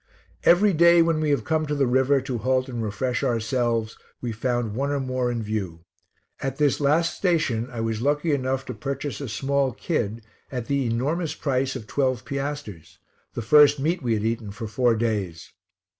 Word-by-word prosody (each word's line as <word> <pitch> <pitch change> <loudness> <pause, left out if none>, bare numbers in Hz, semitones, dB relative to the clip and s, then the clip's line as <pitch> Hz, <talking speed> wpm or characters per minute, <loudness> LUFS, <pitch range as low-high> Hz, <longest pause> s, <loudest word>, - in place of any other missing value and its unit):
Every 195 +3 +5
day 170 +1 +6
when 165 -1 +1
we 155 -1 0
have 145 - +1
come 155 -1 0
to 150 - -1
the 140 -1 +2
river 130 +2 +3
to 130 -3 -4
halt 130 +3 +1
and 120 -3 -4
refresh 115 +4 -2
ourselves, 115 -1 0 0.2
we 120 - -3
found 120 -1 -1
one 135 +5 -1
or 145 -1 0
more 130 -2 -1
in 120 -2 -2
view. 95 -6 -4 0.5
At 135 -1 -3
this 145 -3 +2
last 155 +4 +2
station 140 - 0
I 120 -3 -5
was 115 -1 -2
lucky 145 +4 +1
enough 135 -1 -1
to 125 - -5
purchase 140 +5 -4
a 135 - -5
small 135 +3 0
kid 115 - -3 0.3
at 125 -3 -4
the 140 -1 0
enormous 150 +8 -1
price 135 -2 -1
of 125 -5 -6
twelve 130 -3 -1
piasters, 140 - -5 0.4
the 120 - -3
first 145 +4 +6
meat 165 +6 0
we 120 -3 +1
had 105 0 -2
eaten 115 -2 -2
for 105 +3 -6
four 115 +2 +2
days. 105 -7 -3
130 Hz, 190 wpm, -24 LUFS, 115-145 Hz, 0.5 s, day